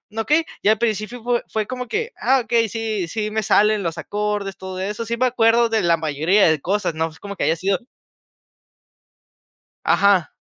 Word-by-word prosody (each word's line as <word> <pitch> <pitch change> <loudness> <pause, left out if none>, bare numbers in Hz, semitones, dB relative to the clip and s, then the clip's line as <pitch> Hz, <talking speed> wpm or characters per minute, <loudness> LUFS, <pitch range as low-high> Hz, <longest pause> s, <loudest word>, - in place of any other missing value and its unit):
okey. 300 +9 +2 0.2
Y - - -1
al 220 - +4
principio 220 +1 -2
fue 240 -1 +1
fue 215 -1 -2
como 250 -1 -5
que: 450 - -2
"Ah 265 -1 +3
okey, 230 -1 +2
sí 215 -4 -3
sí 215 +2 -3
me 220 0 0
salen 210 +1 +3
los 165 -1 -3
acordes, 205 -1 -3
todo 185 0 -7
eso". 210 +4 -3
Sí 235 +1 -3
me 255 - +2
acuerdo 235 -1 +3
de 220 -2 +1
la 170 -1 +3
mayoría 160 +6 +2
de 155 -2 +1
cosas, 195 -3 -1
no, 160 +1 0
pues, 160 0 -14
como 200 0 -7
que - - -1
haya 160 +2 +2
sido 190 +2 0 2.0
Ajá. 200 -4 +3
210 Hz, 190 wpm, -21 LUFS, 190-230 Hz, 2.0 s, al